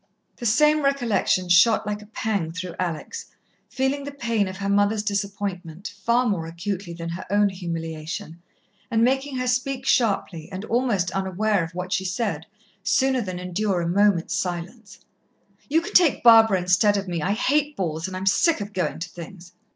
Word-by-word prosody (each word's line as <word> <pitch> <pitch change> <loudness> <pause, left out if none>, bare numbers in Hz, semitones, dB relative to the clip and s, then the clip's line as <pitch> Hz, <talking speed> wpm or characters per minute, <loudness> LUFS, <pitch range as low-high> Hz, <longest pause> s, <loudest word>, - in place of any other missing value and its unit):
The 240 - -2
same 300 +7 +4
recollection 240 -9 +1
shot 180 +6 +5
like 210 0 -3
a 210 - -13
pang 205 -6 -2
through 180 0 -6
Alex, 180 - -4 0.4
feeling 265 +2 -1
the 285 - -6
pain 230 -7 -1
of 185 0 -7
her 200 0 -3
mother's 205 +1 +2
disappointment 200 -3 -4
far 240 +2 +2
more 175 -7 -1
acutely 175 +2 -5
than 170 0 -6
her 170 +2 -5
own 205 +1 +3
humiliation, 165 -2 -6 0.5
and 225 -2 +2
making 270 +2 +1
her 255 - -1
speak 255 +1 -1
sharply, 200 - +1
and 190 +2 -6
almost 225 -8 0
unaware 195 +1 0
of 165 +1 -8
what 180 +1 -3
she 190 - 0
said, 185 -5 -2 0.4
sooner 265 +2 +2
than 185 -4 -5
endure 180 +2 -1
a 170 - -2
moment's 190 -1 +2
silence: 185 +3 -5 0.7
"You 320 +3 +3
can 340 - -8
take 340 -6 +4
Barbara 225 -4 +7
instead 180 +3 +3
of 200 0 -3
me. 170 -3 -2
I 195 +6 0
hate 290 +6 +1
balls 165 -2 -2
and 185 -1 -6
I'm 190 - -5
sick 310 - +3
of 205 0 -6
going 180 -6 -1
to 165 +2 -5
things." 175 +1 -11
200 Hz, 175 wpm, -24 LUFS, 180-235 Hz, 0.7 s, Barbara